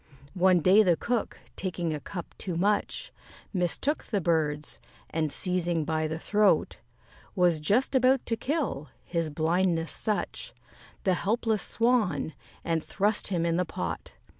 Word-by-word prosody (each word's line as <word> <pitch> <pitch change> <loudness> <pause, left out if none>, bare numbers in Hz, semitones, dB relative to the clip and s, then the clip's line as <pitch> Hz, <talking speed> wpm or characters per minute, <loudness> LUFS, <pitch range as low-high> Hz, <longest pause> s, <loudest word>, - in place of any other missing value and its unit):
One 185 -2 +4
day 190 +7 +6
the 180 -5 +3
Cook, 235 +4 -2 0.2
taking 175 -4 -2
a 150 - -3
cup 175 +4 -7
too 180 -3 -2
much, 205 +4 0 0.4
Mistook 190 - 0
the 210 - -1
birds, 155 -4 -1 0.3
and, 155 -2 -1
seizing 175 -3 0
by 155 0 0
the 160 +1 -3
throat, 210 +4 +2 0.6
Was 175 -4 +3
just 210 - +2
about 260 0 +3
to 230 - +1
kill 255 - -2
his 165 -2 -2
blindness 165 +2 +1
such 215 -2 -2 0.5
The 190 - +3
helpless 220 +3 0
Swan, 220 - +1 0.3
and 165 -2 0
thrust 205 +1 +1
him 175 -4 0
in 170 0 +1
the 180 - +2
pot. 85 - -5
180 Hz, 140 wpm, -28 LUFS, 160-210 Hz, 0.6 s, day